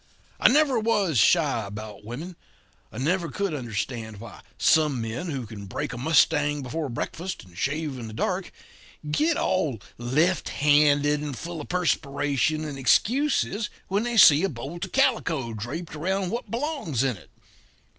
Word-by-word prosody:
"I -, -, +6 dB
never 275 Hz, -2 st, +3 dB
was 205 Hz, -, +1 dB
shy 140 Hz, -2 st, +3 dB
about 105 Hz, 0 st, -8 dB
women. 145 Hz, -, -7 dB, 0.6 s
I -, -, -10 dB
never 165 Hz, +6 st, 0 dB
could 200 Hz, +4 st, -2 dB
understand 115 Hz, -4 st, -4 dB
why 115 Hz, 0 st, -11 dB, 0.2 s
some 150 Hz, -5 st, +3 dB
men 115 Hz, +9 st, -4 dB
who 135 Hz, -7 st, -4 dB
can 105 Hz, -2 st, -9 dB
break 135 Hz, +7 st, -4 dB
a -, -, -6 dB
mustang 150 Hz, 0 st, +3 dB
before 150 Hz, +3 st, -3 dB
breakfast 170 Hz, +9 st, -5 dB
and 90 Hz, -2 st, -18 dB
shave 145 Hz, -, -2 dB
in 115 Hz, -, -6 dB
the 110 Hz, -, -9 dB
dark, -, -, -2 dB, 0.6 s
get 310 Hz, -, +2 dB
all 150 Hz, -, 0 dB, 0.2 s
left 150 Hz, +10 st, +1 dB
handed 145 Hz, 0 st, +3 dB
and 145 Hz, -4 st, -5 dB
full 170 Hz, -2 st, -6 dB
of -, -, -10 dB
perspiration 150 Hz, -3 st, 0 dB
and 145 Hz, -3 st, -6 dB
excuses 225 Hz, -, +2 dB, 0.2 s
when 200 Hz, +2 st, +1 dB
they 240 Hz, 0 st, -2 dB
see 160 Hz, -4 st, +8 dB
a 195 Hz, -, +2 dB
bold 140 Hz, +7 st, -6 dB
of -, -, -13 dB
calico 165 Hz, -, +1 dB
draped 135 Hz, -, -6 dB
around 185 Hz, +4 st, -1 dB
what 235 Hz, +2 st, -4 dB
belongs 240 Hz, -, -2 dB
to 135 Hz, -, +2 dB
it. 100 Hz, -, -11 dB
150 Hz, 160 wpm, -25 LUFS, 125-180 Hz, 0.6 s, see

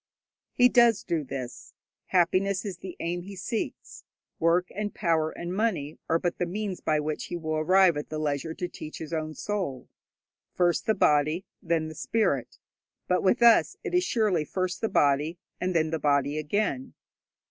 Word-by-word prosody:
He 250 Hz, -, +6 dB
does 235 Hz, -3 st, +4 dB
do 165 Hz, -4 st, -1 dB
this. 125 Hz, -2 st, -7 dB, 0.3 s
Happiness 185 Hz, +2 st, +2 dB
is 190 Hz, -4 st, -5 dB
the 185 Hz, -1 st, -8 dB
aim 175 Hz, +1 st, -2 dB
he 195 Hz, +3 st, -9 dB
seeks. 220 Hz, +5 st, -5 dB, 0.4 s
Work 170 Hz, +2 st, +2 dB
and 205 Hz, 0 st, -4 dB
power 165 Hz, -4 st, +1 dB
and 175 Hz, +2 st, -6 dB
money 185 Hz, -9 st, -1 dB
are 165 Hz, -, +4 dB
but 175 Hz, +1 st, -2 dB
the 175 Hz, -, 0 dB
means 200 Hz, 0 st, -4 dB
by 155 Hz, -1 st, +1 dB
which 150 Hz, 0 st, -3 dB
he -, -, -5 dB
will 155 Hz, -1 st, -2 dB
arrive 185 Hz, +2 st, +4 dB
at 150 Hz, -, -5 dB
the 155 Hz, -, -4 dB
leisure 155 Hz, +1 st, -2 dB
to 180 Hz, -, -3 dB
teach 155 Hz, -3 st, -9 dB
his 160 Hz, 0 st, -7 dB
own 155 Hz, -1 st, -3 dB
soul. 185 Hz, -12 st, -4 dB, 0.7 s
First 175 Hz, -2 st, +1 dB
the 220 Hz, -, +3 dB
body, 155 Hz, +2 st, +2 dB, 0.2 s
then 165 Hz, -2 st, 0 dB
the 155 Hz, -, -7 dB
spirit; 150 Hz, -, -1 dB, 0.5 s
but 180 Hz, -, +2 dB
with 235 Hz, +5 st, +2 dB
us 235 Hz, -1 st, +5 dB
it -, -, -4 dB
is 360 Hz, 0 st, +3 dB
surely 215 Hz, -, +1 dB
first 185 Hz, +3 st, -3 dB
the 225 Hz, -, 0 dB
body, 145 Hz, +4 st, +2 dB, 0.2 s
and 180 Hz, 0 st, -1 dB
then 160 Hz, -1 st, +2 dB
the 160 Hz, -, -1 dB
body 145 Hz, 0 st, +1 dB
again. 150 Hz, -4 st, -2 dB
170 Hz, 180 wpm, -27 LUFS, 155-195 Hz, 0.7 s, He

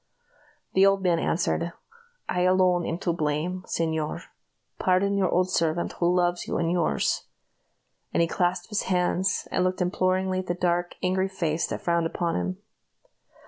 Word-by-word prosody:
The 190 Hz, -, +5 dB
old 195 Hz, 0 st, +4 dB
man 175 Hz, -2 st, +2 dB
only -, -, 0 dB
answered, 170 Hz, 0 st, 0 dB, 0.5 s
"I 180 Hz, -, 0 dB
alone 185 Hz, -1 st, +3 dB
am 165 Hz, -, -2 dB
to 175 Hz, -2 st, -1 dB
blame, 160 Hz, +3 st, -1 dB
señor. 160 Hz, -2 st, -2 dB, 0.6 s
Pardon 190 Hz, +2 st, +2 dB
your 190 Hz, -3 st, +2 dB
old 185 Hz, +1 st, +1 dB
servant, 165 Hz, 0 st, 0 dB
who 175 Hz, 0 st, +3 dB
loves 175 Hz, -1 st, +1 dB
you -, -, -1 dB
and 165 Hz, 0 st, 0 dB
yours!" 175 Hz, -2 st, 0 dB, 0.8 s
and -, -, 0 dB
he 170 Hz, -, +4 dB
clasped 175 Hz, +2 st, -1 dB
his 210 Hz, -, 0 dB
hands, 180 Hz, +1 st, +1 dB
and 180 Hz, -, +1 dB
looked 185 Hz, 0 st, 0 dB
imploringly 185 Hz, +1 st, +1 dB
at 185 Hz, -, -5 dB
the 175 Hz, -, -1 dB
dark, 175 Hz, 0 st, 0 dB
angry 185 Hz, +1 st, +1 dB
face 170 Hz, -4 st, -1 dB
that -, -, -4 dB
frowned 170 Hz, -1 st, +1 dB
upon 170 Hz, 0 st, -2 dB
him. 90 Hz, +1 st, -2 dB
180 Hz, 165 wpm, -26 LUFS, 170-185 Hz, 0.8 s, The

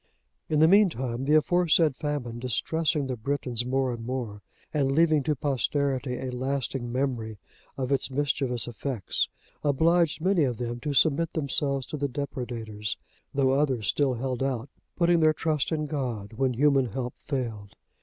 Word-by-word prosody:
In 155 Hz, -, +1 dB
the 160 Hz, -, +7 dB
meantime, 135 Hz, -, +3 dB
the 150 Hz, +2 st, +4 dB
aforesaid 165 Hz, -2 st, +3 dB
famine 135 Hz, -5 st, -3 dB
distressing 150 Hz, +4 st, 0 dB
the 130 Hz, -1 st, -2 dB
Britons 125 Hz, 0 st, -2 dB
more 130 Hz, -1 st, +1 dB
and 115 Hz, -1 st, -7 dB
more, 115 Hz, -4 st, -4 dB, 0.3 s
and 140 Hz, -3 st, +1 dB
leaving 155 Hz, 0 st, +4 dB
to 150 Hz, +3 st, 0 dB
posterity 135 Hz, -1 st, 0 dB
a 130 Hz, -1 st, -4 dB
lasting 130 Hz, -1 st, -2 dB
memory 120 Hz, -4 st, -2 dB, 0.4 s
of 130 Hz, 0 st, -2 dB
its 140 Hz, -, +1 dB
mischievous 135 Hz, -3 st, +1 dB
effects, 120 Hz, -3 st, -2 dB, 0.3 s
obliged 160 Hz, +3 st, +3 dB
many 180 Hz, 0 st, +2 dB
of 125 Hz, -4 st, 0 dB
them 120 Hz, -1 st, -4 dB
to 145 Hz, +3 st, -3 dB
submit 160 Hz, +3 st, +3 dB
themselves 140 Hz, -3 st, 0 dB
to 150 Hz, -, -5 dB
the 140 Hz, 0 st, 0 dB
depredators; 120 Hz, -6 st, -4 dB, 0.4 s
though 135 Hz, -2 st, +3 dB
others 135 Hz, -5 st, +1 dB
still 140 Hz, -3 st, +2 dB
held 125 Hz, +1 st, -3 dB
out, 135 Hz, -1 st, -1 dB, 0.3 s
putting 170 Hz, -1 st, +3 dB
their 155 Hz, -1 st, +5 dB
trust 155 Hz, -2 st, -1 dB
in 155 Hz, -1 st, 0 dB
God, 125 Hz, -8 st, -4 dB
when 130 Hz, +2 st, 0 dB
human 135 Hz, 0 st, +3 dB
help 125 Hz, +2 st, -4 dB
failed. 115 Hz, -8 st, -4 dB
135 Hz, 155 wpm, -27 LUFS, 125-150 Hz, 0.4 s, the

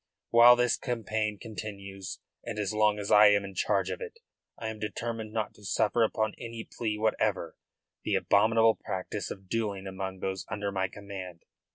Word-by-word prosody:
While 120 Hz, +1 st, +9 dB
this 125 Hz, -1 st, +2 dB
campaign 110 Hz, -3 st, -2 dB
continues, 100 Hz, -3 st, -7 dB, 0.2 s
and 115 Hz, -2 st, -5 dB
as 105 Hz, 0 st, -1 dB
long 105 Hz, -1 st, +3 dB
as 105 Hz, -1 st, -4 dB
I 105 Hz, 0 st, +9 dB
am 100 Hz, -1 st, +4 dB
in 100 Hz, -, -8 dB
charge 90 Hz, -, +1 dB
of -, -, -5 dB
it, 465 Hz, 0 st, -7 dB, 0.4 s
I 110 Hz, -, -4 dB
am 110 Hz, -1 st, -7 dB
determined 110 Hz, +1 st, -4 dB
not 110 Hz, -1 st, -2 dB
to 105 Hz, -, -19 dB
suffer 105 Hz, +4 st, +1 dB
upon 110 Hz, -1 st, +1 dB
any 115 Hz, -1 st, -7 dB
plea 110 Hz, -3 st, -1 dB
whatever 110 Hz, 0 st, 0 dB, 0.5 s
the -, -, 0 dB
abominable 110 Hz, +2 st, +4 dB
practice 95 Hz, +2 st, -4 dB
of 95 Hz, -1 st, -8 dB
duelling 100 Hz, -3 st, -2 dB
among 95 Hz, 0 st, -5 dB
those 95 Hz, 0 st, -3 dB
under 100 Hz, 0 st, -2 dB
my 95 Hz, -1 st, 0 dB
command. 95 Hz, -3 st, -8 dB
105 Hz, 175 wpm, -29 LUFS, 100-110 Hz, 0.5 s, While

